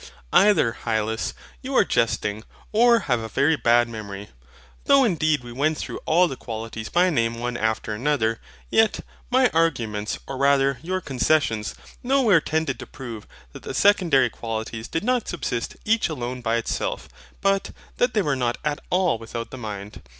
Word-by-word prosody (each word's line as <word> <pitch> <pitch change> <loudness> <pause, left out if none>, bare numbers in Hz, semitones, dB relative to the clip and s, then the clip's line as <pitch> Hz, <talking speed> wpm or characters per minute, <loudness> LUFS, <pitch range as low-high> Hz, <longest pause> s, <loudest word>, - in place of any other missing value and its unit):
Either, 185 - +4
Hylas, 110 -1 -1 0.3
you - - -4
are - - +5
jesting, 105 +1 0 0.3
or 235 +1 +5
have 125 - 0
a 110 - -5
very 145 +8 +2
bad 120 -3 +3
memory. 105 -3 -7 0.6
Though 275 -1 +6
indeed 155 - +1
we 120 - -9
went 150 +5 0
through - - -5
all 175 +3 +4
the 135 - -5
qualities 110 -2 -6
by 180 +1 +3
name 115 -5 +1
one 120 +1 -3
after 110 -1 -1
another, 115 -2 0 0.3
yet 220 -1 +3 0.3
my 255 -1 +4
arguments 115 -11 0
or 135 - -6
rather 140 -1 +3
your 185 +3 -2
concessions, 130 - 0 0.3
nowhere 245 - +4
tended 155 -4 -1
to - - -8
prove 115 -5 -8 0.3
that - - -10
the - - -6
Secondary 160 - +4
Qualities 110 0 -5
did 165 - -3
not 250 0 0
subsist 125 -8 -3
each 225 -2 +2
alone 125 -4 -4
by 115 -1 0
itself; 115 -1 -2 0.3
but, 195 0 +1 0.3
that 245 -1 +1
they 210 - +3
were 145 -3 0
not 120 -2 -1
AT 150 -1 -1
ALL 180 -9 +2
without 115 +1 -6
the - - -7
mind. 105 -2 -7
135 Hz, 165 wpm, -24 LUFS, 115-175 Hz, 0.6 s, Though